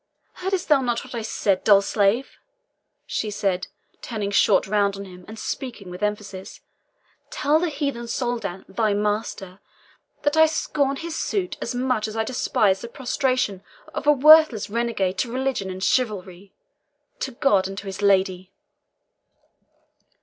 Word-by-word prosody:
"Heard'st 380 0 -2
thou 295 -3 +4
not 240 -2 -1
what - - -11
I 235 - -3
said, 200 -3 0
dull 200 -2 +6
slave?" 205 +5 +1 0.7
she 215 - -2
said, 195 -3 -1 0.3
turning 210 -4 -4
short 200 - +4
round 200 0 +1
on 200 - -7
him, 180 -1 -12
and 220 +1 -9
speaking 220 -7 -5
with 180 - -9
emphasis. 210 -2 -4 0.7
"Tell 300 +2 +2
the 350 0 0
heathen 280 -5 -3
Soldan, 230 -6 -3
thy 205 +1 0
master, 205 -2 -2 0.6
that 290 +1 +1
I 320 0 +7
scorn 285 -3 0
his 330 +2 -5
suit 375 0 -2
as 235 - -3
much 250 -4 0
as 215 +1 -6
I 220 - +2
despise 210 -5 +1
the - - -6
prostration 250 -5 -1 0.3
of 290 - -4
a - - +8
worthless 295 -7 +6
renegade 215 -5 -1
to 235 - -1
religion 260 -6 -2
and 185 0 -6
chivalry 200 -6 -1 0.7
to - - -2
God 205 -7 +2
and 195 0 -8
to 205 - -6
his 195 0 -6
lady!" 190 -2 +2
215 Hz, 150 wpm, -23 LUFS, 195-260 Hz, 0.7 s, a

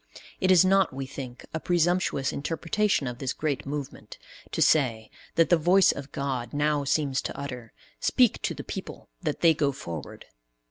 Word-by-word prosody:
It 185 - +1
is 185 -1 +7
not, 195 -1 +4
we 135 +1 -5
think, 130 -2 -8
a 160 - -2
presumptuous 175 -5 +1
interpretation 165 +4 0
of 120 0 -5
this 135 -3 -2
great 145 -4 -2
movement, 140 -1 -6 0.3
to - - -3
say, 115 -8 +2 0.2
that 165 - +4
the 175 - +5
voice 180 +4 +5
of 140 0 -8
God 130 -4 -3
now 145 0 +1
seems 140 -1 0
to - - -6
utter 125 -5 -7 0.3
"Speak - - +3
to - - -2
the - - -7
people - - -8
that - - -3
they 165 -1 +6
go 145 -2 +1
forward." 85 - -8
145 Hz, 175 wpm, -27 LUFS, 130-165 Hz, 0.3 s, is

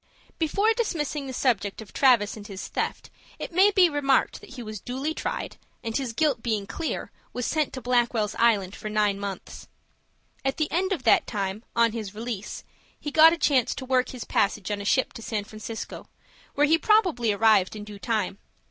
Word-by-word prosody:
Before 400 +8 +2
dismissing 305 - -2
the - - -5
subject 230 -6 0
of 220 -3 -10
Travis 240 -6 +4
and 210 -2 -10
his 195 -2 -7
theft, - - -3 0.3
it - - -6
may 380 +4 +6
be 380 -3 +5
remarked 285 -4 +1
that - - -12
he 245 - -7
was 215 -2 -6
duly 265 +8 -3
tried, - - -4 0.3
and, 225 -1 -4
his 265 -4 -1
guilt 280 0 +1
being 215 -4 -1
clear, 310 +11 -4 0.2
was 250 -1 -3
sent 305 -2 0
to 260 - -6
Blackwell's 240 -4 +1
Island 205 -5 +3
for 215 - -6
nine 210 -2 +1
months. 200 -2 -7 0.8
At 270 0 -1
the 310 -1 -1
end 375 +3 0
of 335 -9 -1
that - - +4
time, 200 0 -3
on 235 -1 +4
his 215 -3 -6
release, 220 -2 -5 0.4
he 295 - -5
got 320 +2 +8
a 340 - -1
chance 270 -7 +2
to 260 - -6
work 255 -1 +2
his 250 -2 -7
passage 200 0 0
on 205 -1 -2
a - - -7
ship 260 +5 +2
to - - -9
San 215 -2 -3
Francisco, 215 +1 -8 0.5
where 290 - +4
he 320 +2 +3
probably 360 - +3
arrived 210 -2 +3
in 210 - -6
due 205 -1 -10
time. 210 -3 -1
235 Hz, 195 wpm, -26 LUFS, 210-290 Hz, 0.8 s, got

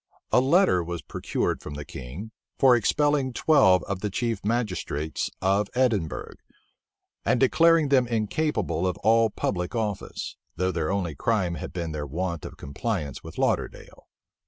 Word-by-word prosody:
A - - +5
letter 135 - +4
was 85 -2 -5
procured - - -2
from 75 - -7
the 75 0 -6
king, 70 - -8 0.3
for 130 -2 +6
expelling 140 +2 +1
twelve 95 - +4
of 100 -1 -4
the 105 - -2
chief 115 0 -2
magistrates 90 - -2
of 100 +2 +2
Edinburgh, 110 -11 0 0.9
and 125 - +2
declaring 165 +3 +4
them 130 -3 +4
incapable 110 - 0
of 90 - -2
all 115 +1 +4
public 90 0 -2
office; 105 -4 -3 0.2
though 90 +2 0
their 80 -1 -1
only 95 -5 -1
crime 95 -2 0
had 85 +2 -6
been 85 -2 -4
their 75 -1 -4
want 85 +2 -3
of - - -9
compliance 70 - -4
with - - -10
Lauderdale. - - -2
100 Hz, 150 wpm, -26 LUFS, 85-120 Hz, 0.9 s, for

